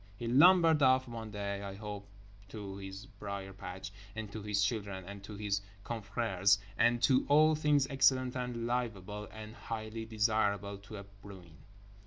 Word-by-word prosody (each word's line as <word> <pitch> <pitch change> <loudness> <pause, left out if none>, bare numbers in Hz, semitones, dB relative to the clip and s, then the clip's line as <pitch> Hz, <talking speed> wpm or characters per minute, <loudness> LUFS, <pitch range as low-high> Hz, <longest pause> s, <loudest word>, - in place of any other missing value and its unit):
He 120 - -4
lumbered 160 +4 +6
off 130 -1 +4
one 115 -2 -6
day—I 100 -1 -4
hope 105 -1 -7 0.4
to 100 -2 -7
his 95 +2 -8
brier 100 -4 -7
patch, 95 0 -7 0.2
and 110 -2 -5
to 110 - -6
his 105 0 +1
children, 100 -3 -2
and 100 +1 -9
to 105 - -8
his 100 -1 -1 0.2
confrères, 100 -3 +1 0.2
and 120 +4 +3
to 130 +1 +5
all 155 +2 +6
things 150 -2 +3
excellent 130 -2 +3
and 125 -2 -3
livable 105 -4 -3
and 110 0 -9
highly 110 -1 -5
desirable 105 -2 0
to 105 +2 -10
a 100 - -7
bruin. 100 -4 -14
105 Hz, 155 wpm, -33 LUFS, 100-120 Hz, 0.4 s, lumbered